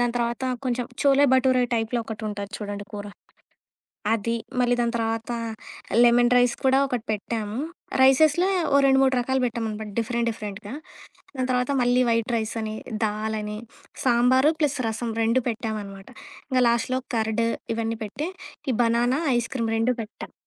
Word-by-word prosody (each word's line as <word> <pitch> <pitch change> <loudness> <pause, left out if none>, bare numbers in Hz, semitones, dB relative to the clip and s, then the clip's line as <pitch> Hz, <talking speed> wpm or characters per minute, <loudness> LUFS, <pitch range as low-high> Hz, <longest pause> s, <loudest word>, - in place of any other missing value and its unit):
దాని 240 -1 +1
తర్వాత 235 +1 -1 0.2
కొంచెం 245 -1 -1 0.2
చోలే 280 0 +5
బటూరే 260 -1 +4
టైప్‌లో 225 +1 0
ఒకటుంటది 210 -2 -5
చూడండి 205 -1 -5
కూర. 205 0 -6 1.1
అది, 230 +1 -1 0.3
మళ్ళీ 245 0 +3
దాని 235 0 +1
తర్వాత, 225 +1 -2 0.7
లెమన్ 240 0 +5
రైస్ 245 -1 +4
కూడా 265 0 +5
ఒకటి 250 -3 -3
పెట్టాము. 215 +1 -3 0.4
రైసెస్‌ల 300 +6 +5 0.3
ఓ - - +7
రెండు 270 0 +5
మూడు 265 -1 +3
రకాలు 265 +2 0
పెట్టామనమాట 220 -3 -3
డిఫరెంట్ 235 +1 0
డిఫరెంట్‌గా. 210 +1 -7 0.6
దాని 255 -1 -1
తర్వాత 250 +2 +1
మళ్ళీ 245 +1 +3
వైట్ 230 +1 +1
రైస్ 220 +1 -3
అని, 215 0 -4 0.3
దాల్ 215 +1 -1
అని, 210 0 -5 0.5
సాంబార్ 255 +3 +4
ప్లస్ 290 -2 +1
రసం 225 +1 -3
రెండు 230 +3 +2
పెట్టామన్నమాట. 210 -4 -5 0.4
ఇంగ 255 -1 +2
లాస్ట్‌లో 235 +2 0 0.2
కర్డ్ 220 +1 0 0.3
ఇవన్నీ 225 0 -2
పెట్టి, 275 - -4 0.4
ఈ - - 0
బనానా 240 +3 +2 0.2
ఐస్‌క్రీమ్ 230 -1 -2
రెండు 240 +3 +2
పెట్టాం. 215 +1 -9
235 Hz, 145 wpm, -25 LUFS, 220-255 Hz, 1.1 s, ఓ